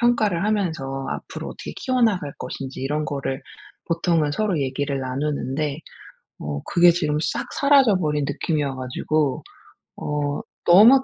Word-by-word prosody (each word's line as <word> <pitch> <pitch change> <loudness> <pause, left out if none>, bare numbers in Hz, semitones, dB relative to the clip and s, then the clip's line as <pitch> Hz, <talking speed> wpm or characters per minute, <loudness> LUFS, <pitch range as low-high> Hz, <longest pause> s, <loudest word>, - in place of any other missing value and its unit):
평가를 215 -7 +2
하면서 160 -11 -1
앞으로 - - -5
어떻게 - - -7
키워나갈 220 - +1
것인지 135 -1 -6
이런 150 +3 -1
거를 140 -2 -3 0.5
보통은 165 -3 +2
서로 195 -2 0
얘기를 140 +1 -1
나누는데 140 +2 -2 0.6
어 75 -1 -4
그게 175 0 +6
지금 155 -3 0
싹 150 -1 -2
사라져 275 -7 +5
버린 150 -4 0
느낌 155 +3 -1
이어 140 -2 -1
가지고 130 +3 -1 0.6
어 145 -1 -2 0.3
너무 225 +10 +8
150 Hz, 305 characters per minute, -23 LUFS, 140-185 Hz, 0.6 s, 너무